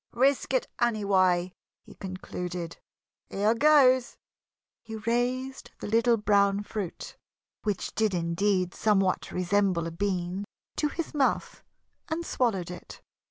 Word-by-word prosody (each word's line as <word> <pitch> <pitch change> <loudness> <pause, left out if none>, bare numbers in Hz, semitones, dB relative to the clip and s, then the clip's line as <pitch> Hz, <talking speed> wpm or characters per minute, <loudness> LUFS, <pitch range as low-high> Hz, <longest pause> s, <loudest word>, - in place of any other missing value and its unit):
"Risk 270 +3 +2
it, - - +1
anyway," 190 -6 +2 0.3
he - - -14
concluded. 180 -2 -6 0.5
"Here 205 +3 +2
goes!" 260 -1 +4 0.6
He 220 -1 -8
raised 245 +4 -2
the - - -6
little 230 +2 +3
brown 200 -1 +2
fruit 205 -4 -6 0.5
which 210 -3 -2
did 215 -3 +1
indeed 180 +2 0
somewhat 195 -4 +1
resemble 185 -1 +1
a 165 - -4
bean 185 +1 -2 0.3
to 300 - +2
his 325 +2 -5
mouth 280 -3 0 0.5
and 335 +1 -2
swallowed 195 - 0
it. 180 - -10
205 Hz, 115 wpm, -28 LUFS, 185-240 Hz, 0.6 s, goes